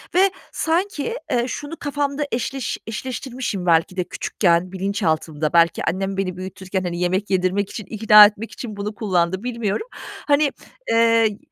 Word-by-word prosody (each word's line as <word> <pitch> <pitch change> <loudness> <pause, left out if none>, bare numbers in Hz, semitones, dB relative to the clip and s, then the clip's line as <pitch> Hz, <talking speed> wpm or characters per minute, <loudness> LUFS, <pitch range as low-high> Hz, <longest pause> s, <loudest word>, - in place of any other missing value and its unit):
ve 385 +1 +5 0.2
sanki, 360 +6 -1
eee, 240 0 +1
şunu 290 +5 -6
kafamda 290 0 -2
eşleş 250 +2 -2
eşleştirmişim 245 -4 -4
belki 170 +2 +2
de 180 - +1
küçükken, 175 0 0
bilinçaltımda. 165 -6 -1
Belki 170 -1 +4
annem 195 +2 -3
beni 185 -2 -2
büyütürken, 190 0 -4
hani, 175 -1 -3
yemek 185 +3 0
yedirmek 190 +1 +1
için, 215 - -7
ikna 210 0 +8
etmek 215 +2 -2
için 215 -5 -7
bunu 210 +1 -4
kullandı, 190 -1 0
bilmiyorum. 235 - -2 0.4
Hani, 290 0 +4 0.4
eee, 230 -2 +3
205 Hz, 140 wpm, -21 LUFS, 185-245 Hz, 0.4 s, ikna